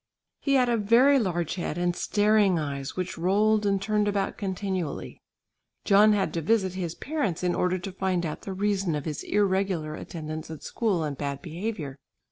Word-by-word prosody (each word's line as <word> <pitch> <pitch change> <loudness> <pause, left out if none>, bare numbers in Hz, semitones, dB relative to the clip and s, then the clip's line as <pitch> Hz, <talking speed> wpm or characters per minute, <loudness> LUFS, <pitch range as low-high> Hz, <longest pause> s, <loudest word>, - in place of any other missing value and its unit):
He 275 -1 +1
had 255 -2 +4
a 235 -1 +2
very 240 +7 +5
large 175 -7 -1
head 175 -3 -3
and 175 0 0
staring 205 -3 +3
eyes 140 -3 -4
which 185 -2 -4
rolled 210 +4 +3
and 195 -1 +2
turned 210 +1 +1
about 200 -1 0
continually. 190 -5 -4 0.6
John 210 +2 +6
had 200 -2 0
to 165 - -1
visit 190 +1 +1
his 175 -3 -4
parents 255 - -2
in 180 -1 +2
order 180 +1 +1
to 185 +2 -6
find 185 -2 -1
out 155 - -4
the 195 - -5
reason 195 -3 0
of 145 - -4
his 155 -3 -3
irregular 190 -6 0
attendance 155 -1 -6
at 160 -2 -8
school 200 -8 0
and 150 -2 -3
bad 140 -1 -3
behaviour. 165 -5 -5
190 Hz, 180 wpm, -27 LUFS, 165-210 Hz, 0.6 s, John